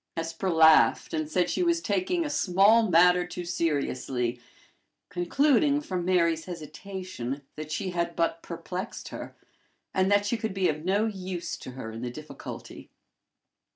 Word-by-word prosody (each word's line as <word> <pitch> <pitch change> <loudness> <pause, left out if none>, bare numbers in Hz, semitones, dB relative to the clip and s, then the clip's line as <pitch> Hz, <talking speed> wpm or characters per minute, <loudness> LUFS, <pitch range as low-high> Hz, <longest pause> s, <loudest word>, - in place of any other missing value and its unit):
Hesper 165 +3 -2
laughed, 160 -2 +5
and 155 -1 -2
said 180 +1 +1
she 180 - -1
was 340 -1 +2
taking 210 - 0
a - - -2
small 205 0 +4
matter 180 +1 +5
too 175 0 -6
seriously 135 -7 -1 0.7
concluding 280 - +2
from 185 -11 -3
Mary's 170 -3 +2
hesitation 170 -5 -6
that 155 0 -7
she 190 +2 -2
had 170 -1 -2
but 165 0 0
perplexed 180 +4 -6
her, - - -8 0.6
and 190 +1 +2
that 205 0 +4
she 230 +3 0
could 220 -3 -4
be 190 -2 +2
of 155 0 -3
no 200 +4 +2
use 185 -5 -4
to 130 - -9
her 120 -3 -7
in 115 +1 -7
the 125 - -3
difficulty. 155 +5 -9
180 Hz, 155 wpm, -27 LUFS, 160-195 Hz, 0.7 s, laughed